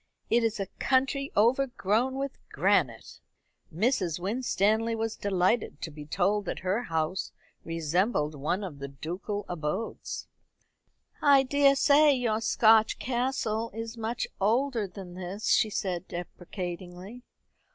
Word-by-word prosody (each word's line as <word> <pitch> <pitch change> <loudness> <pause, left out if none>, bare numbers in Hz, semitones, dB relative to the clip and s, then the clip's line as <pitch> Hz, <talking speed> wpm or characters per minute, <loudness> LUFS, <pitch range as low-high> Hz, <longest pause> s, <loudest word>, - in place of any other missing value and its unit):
It 235 0 +4
is 225 -2 0
a 195 - -1
country 275 +1 +1
overgrown 245 0 +2
with 275 0 -4
granite." - - +1 0.5
Mrs. 180 - 0
Winstanley 220 +2 +1
was 225 0 -2
delighted 195 -2 0
to 160 - -4
be 150 -1 -10
told 195 +5 +1
that - - -4
her 195 +6 +1
house 165 +3 -2 0.3
resembled 165 0 0
one 150 +8 -2
of 160 -7 -7
the 140 - -5
ducal 180 +9 -5
abodes. 175 +6 -4 0.9
"I 280 -2 +6
daresay 285 +2 +5
your 230 -4 0
Scotch 220 -1 +4
castle 240 -3 -1
is 225 +1 -5
much 230 +1 -2
older 230 +2 +1
than 185 -1 -10
this," 185 +3 -4
she 220 - +4
said 185 -3 -3
deprecatingly. 180 +4 -7
210 Hz, 120 wpm, -28 LUFS, 180-240 Hz, 0.9 s, I